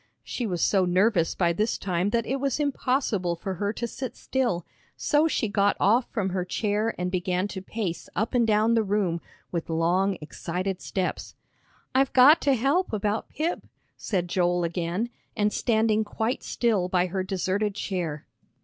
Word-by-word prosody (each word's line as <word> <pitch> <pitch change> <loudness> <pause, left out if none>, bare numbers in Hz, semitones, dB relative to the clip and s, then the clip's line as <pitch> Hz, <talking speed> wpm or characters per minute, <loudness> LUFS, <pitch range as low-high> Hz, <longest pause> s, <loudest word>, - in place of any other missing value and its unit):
She 240 - -3
was 175 -4 -1
so 195 -2 +3
nervous 180 -1 +2
by 170 -2 +2
this 215 +6 0
time 180 0 0
that 230 +1 0
it 270 - -1
was 275 +1 -1
impossible 255 -10 0
for 190 +3 -4
her 205 0 +1
to 235 - -3
sit 260 +2 -6
still, 240 -10 -1 0.3
so 300 +1 +3
she 240 - 0
got 200 0 +2
off 230 +6 +3
from 200 -5 -1
her 185 -1 -1
chair 210 +4 -1
and 180 0 -2
began 180 +1 0
to 190 -1 -6
pace 190 -3 -4
up 220 +5 -1
and 240 -2 +3
down 215 +1 +3
the 230 - +4
room, 195 -5 0 0.3
with 170 -2 -3
long, 175 +4 +1
excited 180 +4 -4
steps. 185 -2 -3 0.6
"I've 270 +1 +2
got 280 +6 +7
to 275 -2 +3
help 280 +10 +1
about 210 0 -1
Pip," 330 +3 -2 0.3
said 180 -4 -2
Joel 175 0 +1
again, 175 +7 -2 0.3
and 210 -1 +2
standing 220 -2 +2
quite 220 +3 -2
still 210 -7 0
by 180 -1 +2
her 190 +1 -2
deserted 195 +2 -1
chair. 175 -8 -3
205 Hz, 170 wpm, -26 LUFS, 180-230 Hz, 0.6 s, got